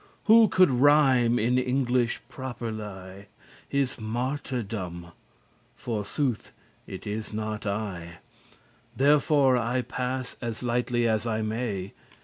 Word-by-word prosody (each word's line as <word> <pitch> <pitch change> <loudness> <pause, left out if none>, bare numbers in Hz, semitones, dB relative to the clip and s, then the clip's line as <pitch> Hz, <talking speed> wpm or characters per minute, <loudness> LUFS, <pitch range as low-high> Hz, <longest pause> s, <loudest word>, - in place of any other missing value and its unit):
Who 225 -1 +7
coulde 185 -5 +5
rhyme 135 -5 +5
in 120 +3 +2
English 125 -2 0
properly 105 -6 -7 0.4
His 140 -3 -1
martyrdom? 110 -7 -4 0.6
forsooth*, 120 +2 -3 0.4
it 95 - -8
is 105 +1 -4
not 110 0 -4
I; 100 -3 -2
*truly 85 +1 -10 0.8
Therefore 140 -1 +4
I 125 +2 0
pass 130 +1 -4
as 115 -1 -4
lightly 120 0 0
as 110 +1 0
I 110 -1 -1
may. 110 -4 -3
120 Hz, 110 wpm, -27 LUFS, 110-130 Hz, 0.8 s, Who